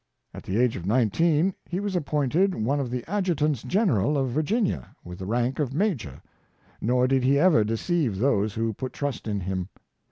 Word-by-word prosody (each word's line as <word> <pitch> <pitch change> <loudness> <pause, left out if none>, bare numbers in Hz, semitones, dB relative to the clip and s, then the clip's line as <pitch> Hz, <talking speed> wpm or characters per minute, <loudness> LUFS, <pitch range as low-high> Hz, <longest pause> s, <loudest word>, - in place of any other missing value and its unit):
At - - -8
the 95 - -3
age 125 -1 +2
of 90 0 -6
nineteen 150 - +2 0.2
he 180 - -2
was 200 -1 -3
appointed 155 +4 +1
one 130 +7 0
of 135 -3 -2
the 125 0 -4
adjutants 160 - 0
general 150 - +1
of 135 -2 0
Virginia, 155 - -1
with 90 0 -9
the 95 - -6
rank 120 +5 0
of 135 -3 -1
major 145 - -2 0.3
— - - -33
nor 125 +3 +2
did 135 -1 +2
he 135 +2 +4
ever 155 -7 +5
deceive 115 - -1
those 105 -3 +1
who 115 0 -1
put 130 +5 -6
trust 140 -6 -4
in 100 -2 -2
him. 95 0 -3
130 Hz, 190 wpm, -25 LUFS, 110-160 Hz, 0.3 s, ever